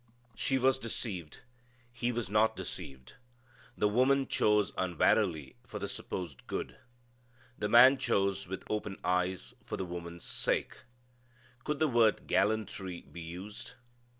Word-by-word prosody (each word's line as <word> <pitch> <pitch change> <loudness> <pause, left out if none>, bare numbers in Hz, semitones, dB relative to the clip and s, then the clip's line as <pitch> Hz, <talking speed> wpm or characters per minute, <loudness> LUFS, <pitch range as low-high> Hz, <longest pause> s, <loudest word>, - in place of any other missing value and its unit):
She 135 -3 +1
was 130 0 +3
deceived. 95 - -5 0.5
He 120 0 -1
was 120 -3 -2
not 105 +3 +3
deceived. 65 -2 -8 0.6
The 105 - +3
woman 130 +5 +3
chose 105 -1 +3
unwarily 90 -4 +1
for - - -7
the - - -3
supposed 85 -9 -6
good. - - -4 0.8
The 105 - -1
man 130 +3 +8
chose 100 -5 +1
with 95 +1 -5
open 105 -2 -3
eyes 90 0 0
for - - -5
the 95 - -3
woman's 85 -1 -7
sake. - - -2 0.8
Could 150 -1 -1
the 155 - +3
word 115 -5 +3
gallantry 100 -4 0
be 85 - -11
used? 90 +8 -8
105 Hz, 130 wpm, -32 LUFS, 90-120 Hz, 0.8 s, man